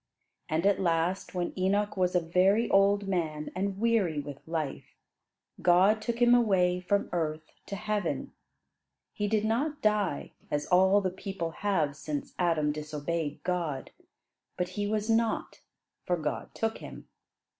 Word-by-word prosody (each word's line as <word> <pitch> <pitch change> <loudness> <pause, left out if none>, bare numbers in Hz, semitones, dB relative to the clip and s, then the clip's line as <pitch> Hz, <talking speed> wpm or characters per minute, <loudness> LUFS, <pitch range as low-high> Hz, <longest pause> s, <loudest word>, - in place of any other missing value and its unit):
And 160 +3 0
at 200 -1 +3
last, 175 +2 0
when 175 -1 -2
Enoch 200 +3 +1
was 180 -1 +1
a - - +6
very 185 +7 +3
old 200 0 +4
man 160 -5 -2
and 195 +1 -2
weary 215 -9 +2
with 145 -1 -7
life, 160 -4 -4 0.7
God 190 +5 +5
took 235 +1 -3
him 240 0 +6
away 190 -7 +3
from 200 +3 0
earth 155 -2 -2 0.2
to 200 - -4
heaven. 210 0 -2 0.8
He 205 - -1
did 215 0 +1
not 285 +7 0
die, 210 -8 +1 0.2
as 145 0 -1
all 190 +3 +4
the 185 -2 -1
people 190 -3 -4
have 160 -6 0
since 145 0 -5
Adam 165 -4 +2
disobeyed 150 +1 -4
God, 170 -7 -2 0.7
but 180 0 -1
"he 205 +2 -2
was 215 0 -1
not, 225 0 0 0.5
for 175 - +2
God 150 -2 -3
took 225 0 -1
him." - - -10
185 Hz, 145 wpm, -29 LUFS, 165-205 Hz, 0.8 s, a